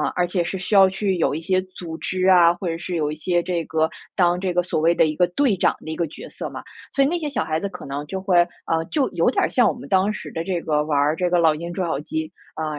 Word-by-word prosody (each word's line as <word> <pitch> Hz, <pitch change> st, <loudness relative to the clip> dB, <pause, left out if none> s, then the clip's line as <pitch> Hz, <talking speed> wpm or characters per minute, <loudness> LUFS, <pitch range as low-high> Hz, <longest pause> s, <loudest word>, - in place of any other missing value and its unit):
而 180 Hz, -, +2 dB
且 175 Hz, +1 st, -1 dB
是 190 Hz, +3 st, -3 dB
需 180 Hz, +4 st, -4 dB
要 195 Hz, -2 st, +7 dB
去 190 Hz, -1 st, -1 dB
有 160 Hz, -, +1 dB
一 -, -, -2 dB
些 185 Hz, +3 st, +1 dB, 0.2 s
组 165 Hz, -2 st, -6 dB
织 185 Hz, +2 st, -1 dB
啊， 175 Hz, -2 st, +6 dB
或 175 Hz, +1 st, -6 dB
者 165 Hz, -, -2 dB
是 175 Hz, +1 st, -5 dB
有 150 Hz, -3 st, 0 dB
一 -, -, -5 dB
些 175 Hz, +3 st, 0 dB
这 175 Hz, -2 st, -2 dB
个 160 Hz, 0 st, 0 dB, 0.3 s
当 175 Hz, -2 st, +3 dB
这 185 Hz, -2 st, -1 dB
个 180 Hz, -, +3 dB
所 170 Hz, -, -1 dB
谓 165 Hz, +2 st, +3 dB
的 -, -, +4 dB
一 155 Hz, -1 st, -2 dB
个 180 Hz, +1 st, +3 dB
队 235 Hz, +4 st, +1 dB
长 180 Hz, -, +2 dB
的 155 Hz, -, -5 dB
一 -, -, -3 dB
个 170 Hz, -, 0 dB
角 150 Hz, -, -10 dB
色 -, -, -6 dB
嘛。 -, -, -7 dB, 0.3 s
所 275 Hz, -, +3 dB
以 -, -, +3 dB
那 345 Hz, +4 st, 0 dB
些 310 Hz, -, -3 dB
小 280 Hz, -, -1 dB
孩 155 Hz, 0 st, -1 dB
子 200 Hz, -, -1 dB
可 180 Hz, -, -9 dB
能 140 Hz, +1 st, -5 dB
就 190 Hz, -, -4 dB
会， 190 Hz, -2 st, +2 dB, 0.3 s
呃， 165 Hz, 0 st, +1 dB
就 285 Hz, -4 st, +1 dB
有 170 Hz, +3 st, +2 dB
点 -, -, +1 dB
儿 -, -, +1 dB
像 245 Hz, -3 st, +3 dB
我 -, -, +1 dB
们 250 Hz, -, -10 dB
当 190 Hz, +1 st, +2 dB
时 -, -, -7 dB
的 165 Hz, -, -3 dB
这 180 Hz, -2 st, -1 dB
个 150 Hz, -2 st, 0 dB
玩 150 Hz, -1 st, -1 dB
儿 145 Hz, +2 st, +3 dB
这 180 Hz, +2 st, 0 dB
个 175 Hz, -, +2 dB
老 160 Hz, -2 st, +4 dB
鹰 170 Hz, +3 st, -6 dB
捉 185 Hz, 0 st, -2 dB
小 160 Hz, -4 st, -1 dB
鸡， 160 Hz, +1 st, -4 dB, 0.2 s
啊， 160 Hz, -, -3 dB
175 Hz, 330 characters per minute, -22 LUFS, 160-190 Hz, 0.3 s, 要